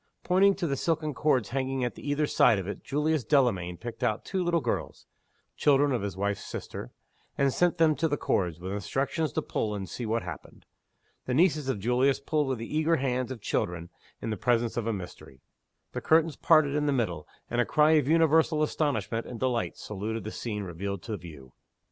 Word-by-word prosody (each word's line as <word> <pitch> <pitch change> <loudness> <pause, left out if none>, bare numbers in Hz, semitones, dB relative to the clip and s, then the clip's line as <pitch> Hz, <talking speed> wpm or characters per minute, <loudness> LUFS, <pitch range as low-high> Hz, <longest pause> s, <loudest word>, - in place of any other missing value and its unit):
Pointing 195 +2 +4
to 185 - -2
the 140 -4 0
silken 155 0 -1
cords 130 -6 +1
hanging 130 0 -1
at 120 - -2
either 145 +1 0
side 115 - +4
of 95 -1 -4
it, 100 - -6
Julius 150 0 0
Delamayn 105 - +2
picked 120 +2 -7
out 110 -1 0
two 190 -2 -1
little 170 -1 +2
girls - - -3 0.5
(children 145 0 +3
of 125 - 0
his 100 -2 -4
wife's 100 +1 -1
sister), - - -7 0.5
and 140 -1 +2
sent 175 0 +2
them 160 -2 +5
to 160 - +1
the 145 -1 -1
cords, 85 -9 0
with 95 +2 -5
instructions 135 +9 -1
to - - -1
pull, 105 -1 -2
and 95 -2 -5
see 115 +7 -5
what 115 +1 0
happened. - - -9 0.6
The 125 - 0
nieces 155 -3 +3
of 130 - 0
Julius 125 +5 +2
pulled 150 -2 0
with 130 -1 -1
the 115 +6 -6
eager 160 +2 +3
hands 130 -3 -1
of 130 -4 -7
children 85 -3 -2 0.3
in 115 - -2
the 110 - -2
presence 120 +2 +1
of 115 -1 -2
a - - +1
mystery 90 - -8 0.5
the - - -4
curtains 160 -1 +3
parted 155 -2 +4
in 150 0 0
the - - +3
middle, 90 - -2 0.2
and 120 +1 +1
a - - +4
cry 150 +4 +3
of 150 -4 +4
universal 160 -1 +4
astonishment 145 -7 -1
and 120 - -7
delight 125 -3 -1
saluted 105 +1 -4
the 110 - -5
scene 105 -3 -4
revealed 95 +1 -5
to 110 - -4
view. 75 -9 -11
130 Hz, 205 wpm, -28 LUFS, 105-150 Hz, 0.6 s, them